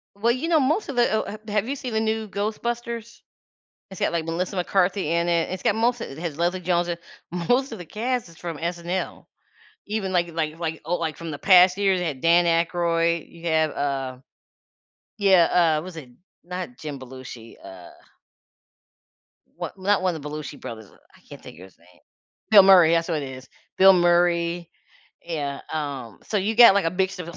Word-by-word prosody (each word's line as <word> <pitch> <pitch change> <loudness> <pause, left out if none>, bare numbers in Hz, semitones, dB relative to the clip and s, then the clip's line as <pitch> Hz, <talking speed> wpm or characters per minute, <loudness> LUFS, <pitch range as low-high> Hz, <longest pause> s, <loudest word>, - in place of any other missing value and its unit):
Well, 230 +4 +2
you 265 +7 -3
know, 320 -3 +4
most 305 +10 0
of 255 -3 -4
it 240 - +4
oh, 220 - +1
ha 210 - -6
have 210 +2 -1
you 280 - -2
seen 250 -3 -6
the 220 - +1
new 220 -1 -1
Ghostbusters? 230 +3 -4 0.7
It's 190 - -9
got, - - +1
like, 165 -2 -2
Melissa 175 +4 -3
McCarthy 185 -1 0
in 170 +1 +1
it, 170 -1 +1
it's 185 - -5
got - - +2
most 235 +1 +1
of - - -5
it 135 - -10
has 160 -3 -5
Leslie 175 +2 0
Jones 175 0 0
in 170 - -3 0.5
most 260 +1 +2
of 225 - -6
the 175 - -9
cast 235 +1 -3
is 165 - -17
from 170 -3 -6
SNL. 175 +2 -4 0.6
Even, 205 -3 -2
like 175 -1 +1
like 160 0 -3
like 160 -1 -4
oh, 175 - 0
like, 160 -3 -3
from 165 -2 -6
the 145 - -7
past 180 -1 +6
years, 195 -2 +2
they 175 - -1
had 135 -4 -5
Dan 170 +1 +4
Aykroyd, 170 0 +1
you 170 0 -8
have, 160 -2 +2
uh 135 -2 -3 1.0
Yeah, 175 -4 +4
uh, 155 - -4
was 180 -2 -9
it 135 -6 -10 0.3
not 180 +7 -6
Jim 150 -3 -6
Belushi, 125 -3 -11
uh 90 -2 -12 1.7
what - - -7
not 195 +1 +1
one 185 -2 +1
of 155 - -8
the 150 - -6
Belushi 150 -1 -7
brothers, 110 -3 -9
uh, - - -22 0.2
I - - -23
can't - - -12
think 80 - -12
of 90 - -11
his 95 - -18
name. 85 +1 -24 0.5
Bill 205 -3 +9
Murray, 180 -4 +7
that's 165 +1 +1
what 160 -4 -1
it 135 - -5
is. 130 0 -10 0.3
Bill 195 0 +8
Murray 175 -1 +2 0.5
yeah, 145 -5 -4
um, 140 -8 -5
so 215 - -3
you 210 +3 0
got, 235 -4 +9
like, 200 -3 +2
a 165 - +1
mix 190 0 -2
of 170 - -7
a 170 - -9
175 Hz, 205 wpm, -24 LUFS, 160-200 Hz, 1.7 s, Bill